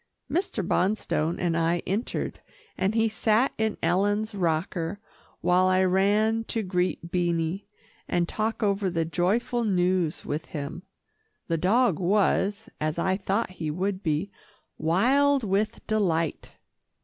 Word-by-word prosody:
Mr. 275 - -1
Bonstone 180 -4 0
and 170 -2 0
I 170 +1 +1
entered, 205 +6 -2 0.4
and 195 +3 0
he 225 0 +3
sat 220 +3 +2
in 220 -1 0
Ellen's 205 +4 +1
rocker 170 +1 -1 0.4
while 180 +1 +3
I 185 0 +3
ran 205 +4 +2
to 225 0 -2
greet 180 -2 -1
Beanie, 175 +1 -1 0.4
and 175 -1 +1
talk 220 +3 -2
over 200 -1 +1
the 165 -2 -1
joyful 225 +9 0
news 180 -5 +1
with 150 +2 -3
him. 145 +2 -5 0.7
The 165 -1 +1
dog 205 +1 +3
was, 200 +3 +1
as 155 +1 -1
I 190 +2 +1
thought 195 +1 -1
he 155 - -1
would 190 +4 -2
be, 160 +4 -1 0.5
wild 265 - +3
with 205 +1 -1
delight. 170 -8 0
190 Hz, 130 wpm, -26 LUFS, 170-215 Hz, 0.7 s, he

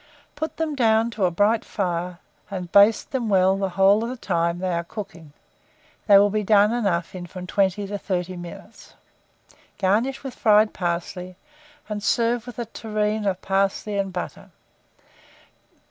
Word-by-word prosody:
Put 315 0 -4
them 320 -2 -1
down 230 -3 +2
to 210 -4 0
a - - +3
bright 205 +6 +2
fire, 180 -3 -3 0.3
and 180 -4 -6
baste 205 +2 +5
them 245 -5 -2
well 190 -1 +4
the 195 0 -1
whole 200 +3 +5
of 230 - -3
the 255 - -4
time 170 -5 -1
they 185 0 -2
are 170 0 -1
cooking 170 -5 -9 0.8
(they 200 -2 +8
will 205 +1 +5
be 215 +1 0
done 210 +1 +4
enough 180 -8 -1
in 180 -1 -7
from 180 +1 -8
20 195 +1 0
to 200 +1 -5
30 185 -2 -3
minutes); 175 -1 -11 0.8
garnish 215 +9 0
with 270 -2 -6
fried 215 -1 +4
parsley, 180 +1 -4 0.5
and 210 -1 -4
serve 235 +3 +1
with 245 - -9
a 240 - -3
tureen 215 -1 -2
of 190 -1 -2
parsley 195 +2 0
and 195 -1 -1
butter. 180 -1 -6
200 Hz, 160 wpm, -23 LUFS, 185-220 Hz, 0.8 s, they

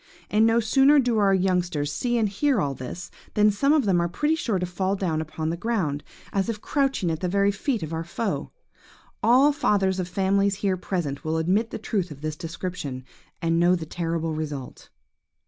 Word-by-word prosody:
And 215 +2 +4
no 225 +1 +4
sooner 270 +6 +5
do 245 -5 +2
our 200 -1 +4
youngsters 180 -6 0
see 240 - 0
and 220 -2 +2
hear 255 +5 +1
all 140 -5 0
this, 135 +8 -7 0.2
than 210 0 +5
some 275 +8 +2
of 300 -5 +3
them 180 -4 +3
are 170 - 0
pretty 295 - 0
sure 250 - 0
to 180 - -1
fall 185 +2 -1
down 170 -5 -1
upon 160 0 -3
the - - -2
ground, 170 -8 -1 0.3
as 195 +2 0
if 220 -2 -3
crouching 270 - 0
at 160 - -3
the 180 - -1
very 200 +2 +3
feet 215 - -2
of 160 +1 -5
our 160 0 -2
foe. 195 +5 -3 0.7
All 260 +6 +5
fathers 200 -10 +1
of 180 - -2
families 195 +2 +1
here 195 -1 0
present 170 -6 -3
will 160 0 -1
admit 190 +8 +1
the - - -5
truth 200 -4 -2
of 145 -2 -10
this 155 -1 -3
description, 165 -5 -5 0.4
and 165 0 +2
know 175 +1 +4
the 165 -3 -5
terrible 165 0 -2
result. 150 -4 -6
185 Hz, 200 wpm, -25 LUFS, 165-215 Hz, 0.7 s, sooner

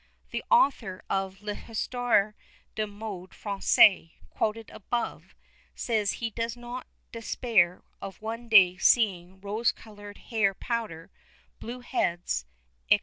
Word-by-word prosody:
The - - -3
author 260 - +2
of 195 +1 -2
L'Histoire 220 0 0 0.4
des 215 -1 -2
Modes 205 -3 -8
Française, 200 -3 +4 0.2
quoted 220 +1 -2
above, 235 +3 -4 0.4
says 215 -4 0
he 230 -1 -4
does 230 +1 -3
not 245 +1 -7 0.2
"despair 225 -6 +1 0.2
of 195 - -7
one 230 +2 -6
day 185 -5 +7
seeing 190 -5 +2
rose 215 +4 +1
coloured 205 -2 -12
hair 205 -5 0
powder, 220 -10 -4 0.5
blue 245 +2 -7
heads," 175 - -1 0.4
&c. - - +6
215 Hz, 115 wpm, -28 LUFS, 195-230 Hz, 0.5 s, day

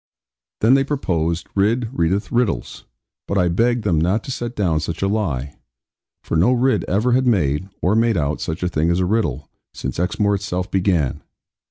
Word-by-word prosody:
Then 115 +4 +5
they 135 0 +4
proposed, 85 - -1
'Ridd 110 +4 +1
readeth 95 +1 0
riddles': 120 -3 -1 0.4
but 100 - -1
I 90 -2 +3
begged 115 +6 +1
them 85 -7 +1
not 95 +6 +1
to - - -6
set 120 -1 -4
down 85 -7 +1
such 85 +4 -4
a - - +2
lie; 75 - -2 0.6
for - - -3
no 95 +11 +4
Ridd 130 +2 +2
ever 110 +7 +1
had 130 +1 +2
made, 90 - +1
or 90 - +3
made 115 -2 +2
out, 75 -1 -1
such 80 +2 -4
a - - +1
thing 80 -1 0
as 85 +1 +1
a 90 - +1
riddle, 95 - -1 0.3
since 65 +3 -4
Exmoor 100 +3 +1
itself 95 -2 -3
began. 90 -8 +1
95 Hz, 185 wpm, -20 LUFS, 85-115 Hz, 0.6 s, Then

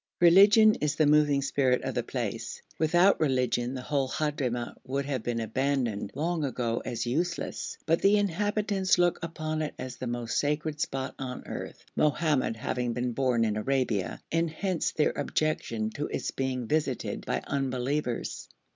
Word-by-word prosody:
Religion 200 +5 +7
is 150 0 +1
the 155 - +3
moving 145 -1 +4
spirit 130 -2 +1
of - - -2
the - - 0
place; - - -4 0.2
without 175 +5 +4
religion 125 -3 +1
the 130 - -5
whole 140 -2 0
Hadhramout 130 -5 -2
would 135 +2 -2
have 135 -4 -2
been 120 0 -2
abandoned 115 -2 -1
long 165 +2 -1
ago 120 -4 -1
as 115 0 -3
useless, 170 +8 -2
but 165 +1 +2
the 200 +1 +5
inhabitants 205 0 +1
look 175 -1 +2
upon 155 -1 -3
it 155 - -3
as 130 -1 -6
the 130 - -5
most 120 -1 -1
sacred 150 +1 -1
spot 135 -3 -2
on 125 -1 -5
earth, - - -7
Mohammed 150 -5 +2
having 120 +1 -2
been 125 +1 -1
born 120 -2 +1
in 105 -1 0
Arabia, 115 -4 0
and 165 +1 +1
hence 180 +2 -1
their 150 - +1
objection 115 -8 -1
to 145 +6 -3
its - - -3
being 130 -2 -2
visited 145 -1 -1
by - - 0
unbelievers. 135 -1 -2
140 Hz, 160 wpm, -28 LUFS, 125-155 Hz, 0.2 s, Religion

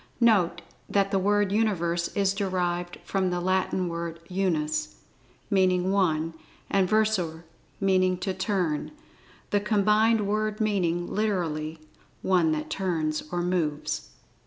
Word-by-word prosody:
Note 215 -7 +3 0.3
that 195 -1 +2
the 195 - +2
word 205 +1 +2
Universe 175 -6 +1
is 195 -1 +2
derived 180 -3 -2
from 190 -2 0
the 180 0 -1
Latin 185 0 0
word 170 -1 -4
"Unus," 155 -5 -1 0.6
meaning 185 -1 +3
"One," 165 -5 +1 0.4
and 190 -2 +3
"Versor," 195 -7 +1 0.4
meaning 185 -2 +2
"to 190 +1 -2
turn," 180 - -1 0.6
the 205 - +3
combined 215 +2 +3
word 215 +1 -1
meaning, 180 -5 +1
literally, 165 -7 -1 0.5
"One 175 -4 +3
that 155 0 -3
turns, 160 -5 -1
or 175 0 -1
moves." 150 - -1
185 Hz, 120 wpm, -27 LUFS, 170-200 Hz, 0.6 s, Note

